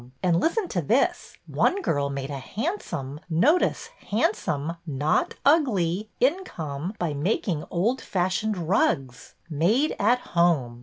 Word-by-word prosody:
And 175 -2 +3
listen 365 - 0
to 175 - -1
this. 235 - 0
One 395 - +1
girl 140 - 0
made 140 0 -4
a 140 - -4
handsome 170 - -4
— - - -38
notice, 265 - +2 0.2
handsome, 165 - 0
not 145 +1 0
ugly 215 - +2
— - - -43
income 190 - -1
by 170 -4 -1
making 155 +1 -1
old 220 +9 0
fashioned 190 +3 -1
rugs. 135 -7 0
Made 185 - +1
at 235 +5 +4 0.2
Home 155 -9 +2
175 Hz, 135 wpm, -25 LUFS, 145-230 Hz, 0.2 s, at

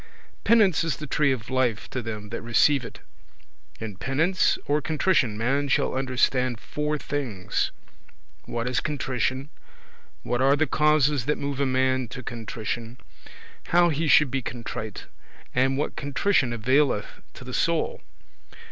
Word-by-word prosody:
Penance 210 -8 +4
is 165 -5 -1
the 155 - -6
tree 145 0 +2
of 120 -2 -4
life 125 -4 0
to 130 - -2
them 105 -2 -6
that 115 - -5
receive 130 +4 +3
it. - - -10 0.8
In 105 -4 -6
penance 160 - +1
or 150 +1 +1
contrition 150 - +1
man 135 +6 0
shall 135 - +1
understand 130 -2 +1
four 150 +3 -2
things: 130 -11 -2 0.7
what 120 0 -3
is 125 -1 +1
contrition; 130 -2 -2 0.7
what 120 +1 -1
are 135 +2 +5
the 155 +2 +2
causes 150 -3 +2
that 150 - +1
move 140 -1 -3
a 140 - +2
man 130 -1 +1
to 125 - -8
contrition; 115 +1 -5 0.7
how 175 0 +4
he 160 +1 -1
should 150 -2 +5
be 135 - -1
contrite; 115 -4 -6 0.5
and 135 +1 +2
what 145 - -2
contrition 145 -1 +1
availeth 125 -1 +1
to - - -10
the - - -8
soul. - - 0
130 Hz, 145 wpm, -25 LUFS, 120-150 Hz, 0.8 s, are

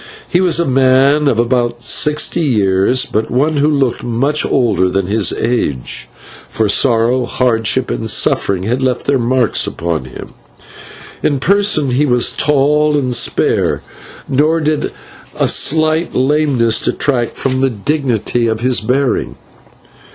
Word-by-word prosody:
He 175 - +1
was 180 -2 +1
a 170 - +1
man 135 +2 +3
of 125 - +1
about 120 0 -1
sixty 150 +7 0
years, 105 - +1
but 110 +1 -2
one 145 +5 0
who 145 +1 +2
looked 140 -5 0
much 135 +6 0
older 100 -7 +1
than 95 0 -1
his 100 -1 0
age, 110 - -3 0.4
for 110 - -1
sorrow, 120 +3 +2
hardship, 115 -3 0
and - - -3
suffering 95 -2 0
had 120 +6 -1
left 130 -2 -1
their 140 -2 +1
marks 125 0 0
upon 85 -5 -3
him. 65 - -11 0.9
In 145 -3 0
person 195 -5 +1
he 145 +4 +1
was 125 -2 +1
tall 150 +1 +1
and 130 -3 -1
spare, - - 0 0.4
nor 150 +4 +1
did 155 -1 -1 0.5
a - - +1
slight 155 +2 +1
lameness 130 -4 +1
detract 120 -5 -1
from 130 -1 -2
the 135 - +2
dignity 120 -1 -1
of 110 0 -2
his 125 0 +1
bearing. 130 +4 -1
130 Hz, 140 wpm, -14 LUFS, 115-145 Hz, 0.9 s, man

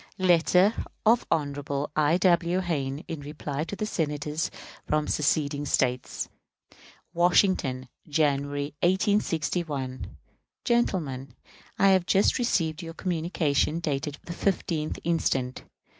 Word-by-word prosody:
Letter 185 +2 +4 0.3
of 230 +2 +4
Hon. 145 -4 0 0.4
I. 155 +2 +3
W. 175 -1 +3
Hayne 145 -5 -2
in 165 - -5
reply 145 0 -4
to 205 +5 -4
Senators 150 -4 -2 0.4
from 150 0 +1
seceding 145 -1 0
States. 125 -1 0 0.9
Washington, 175 -7 +2 0.2
January, 145 -1 0
1861. 165 -7 0 0.5
Gentlemen: 145 - 0 0.4
I 195 - +5
have 185 -2 +3
just 195 +6 +3
received 165 -10 0
your 165 -1 -8
communication, 165 -3 0
dated 145 -2 -2
the 170 - -5
15th 170 -5 -1
instant. 135 -6 -1
160 Hz, 100 wpm, -27 LUFS, 145-180 Hz, 0.9 s, I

